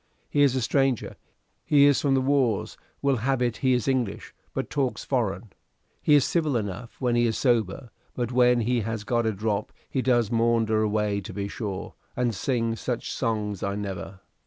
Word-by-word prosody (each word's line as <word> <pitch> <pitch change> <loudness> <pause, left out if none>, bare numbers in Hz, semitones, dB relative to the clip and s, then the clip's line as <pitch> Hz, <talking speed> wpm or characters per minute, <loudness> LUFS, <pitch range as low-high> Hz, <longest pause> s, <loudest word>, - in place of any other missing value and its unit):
He 145 - +2
is 140 -3 +4
a 130 - 0
stranger. 135 0 +1 0.5
He 145 -1 +5
is 145 -1 +4
from 140 -2 +2
the 130 - +2
wars: 130 -6 +1 0.3
will 140 -2 +3
have 130 +3 0
it 120 -3 0
he 130 -1 +2
is 125 0 0
English, 130 -6 -1 0.2
but - - -4
talks 135 -4 -1
foreign. 110 -5 -2 0.5
He 150 - +5
is 145 - +5
civil 155 -7 +1
enough 105 +2 -5
when 125 -2 +1
he 120 0 +3
is 110 - -1
sober, 120 -1 0 0.2
but 120 -1 -2
when 125 -1 +4
he 120 +1 +1
has 110 0 -3
got 120 +1 0
a - - +2
drop 105 0 -2 0.2
he 130 - -1
does 120 -4 +2
maunder 115 -2 +2
away 105 -1 0
to 95 - -8
be 100 -1 -3
sure, 100 -2 -5 0.2
and 120 -2 0
sings 115 0 -1
such 120 -2 -3
songs 105 -5 -2
I 100 0 -2
never." 95 -2 -6
120 Hz, 190 wpm, -26 LUFS, 105-130 Hz, 0.5 s, He